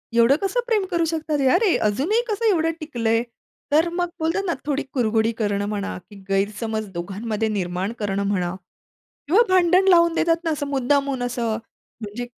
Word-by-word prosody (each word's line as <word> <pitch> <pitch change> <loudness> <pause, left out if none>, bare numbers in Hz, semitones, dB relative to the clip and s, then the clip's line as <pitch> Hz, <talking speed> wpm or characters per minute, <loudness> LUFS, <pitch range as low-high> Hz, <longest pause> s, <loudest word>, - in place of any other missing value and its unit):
एवढं 235 +4 +5
कसं 395 +5 0
प्रेम 425 -5 +1
करू 335 -1 +1
शकतात. 310 -2 -2 0.2
अरे 415 -6 +3
अजूनही 320 - +1
कसं 440 +1 -2
एवढं 330 -3 +2
टिकलंय. 235 -6 0 0.5
तर 320 +3 +4
मग 350 -1 -1
बोलतात 330 +5 0
ना 340 - 0
थोडी 290 -1 -1
कुरघुडी 225 -3 +1
करणं 205 -2 -1
म्हणा, 205 -1 -3
की 205 - -13
गैरसमज 215 +2 -1
दोघांमध्ये 205 +5 -3
निर्माण 185 0 -2
करणं 200 -1 -1
म्हणा 180 -3 -1 0.7
किंवा 385 +9 +5
भांडण 370 +1 +4
लावून 340 -2 +5
देतात 330 0 +2
ना 325 - 0
असं 285 -1 -2
मुद्दामहून 275 -1 0
असं. 235 -3 -1 0.4
म्हणजे 215 +3 -5
255 Hz, 160 wpm, -22 LUFS, 210-335 Hz, 0.7 s, एवढं